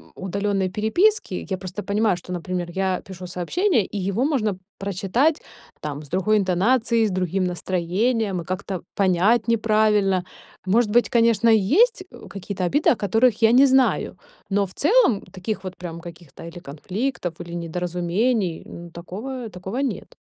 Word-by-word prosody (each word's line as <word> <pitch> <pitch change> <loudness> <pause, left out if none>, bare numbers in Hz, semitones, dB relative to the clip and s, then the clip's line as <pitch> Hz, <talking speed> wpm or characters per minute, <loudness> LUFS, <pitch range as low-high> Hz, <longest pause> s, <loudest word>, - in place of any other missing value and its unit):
удалённой 195 0 -1
переписки. 220 - +1
Я 190 - -1
просто 190 +2 -6
понимаю, 205 -2 +1
что, 180 - -10
например, 175 0 -4
я 190 -1 -1
пишу 185 -1 -9
сообщение, 225 - 0
и 205 - -7
его 200 +7 0
можно 220 -10 0 0.2
прочитать, 200 - 0 0.4
там, 150 -1 -5
с 145 - -16
другой 200 +4 +2
интонацией, 220 +5 +2
с - - -3
другим 185 +1 -1
настроением 185 +4 -1
и - - -10
как-то 185 -1 -4
понять 200 +5 +3
неправильно. 215 -4 +2 0.4
Может 215 +3 +2
быть, 240 +1 +3
конечно, 230 -1 +3
есть, 335 - +4
э, - - -12
какие-то 195 -1 -5
обиды, 290 - +2
о - - +3
которых 225 +3 +2
я 225 - +6
не 265 +3 +7
знаю, 265 0 +2 0.3
но 200 0 +2
в 185 - -12
целом 310 - +3
таких 195 +1 -4
вот 185 -1 -6
прям 170 -2 -7
каких-то 165 -3 -12
или 170 +1 -9
конфликтов, 180 - -4
или 170 0 -8
недоразумений, 175 +4 -1
ну, 170 0 -10
такого, 225 +8 -6
такого 190 +5 -7
нет. 275 - -3
195 Hz, 155 wpm, -23 LUFS, 180-230 Hz, 0.4 s, не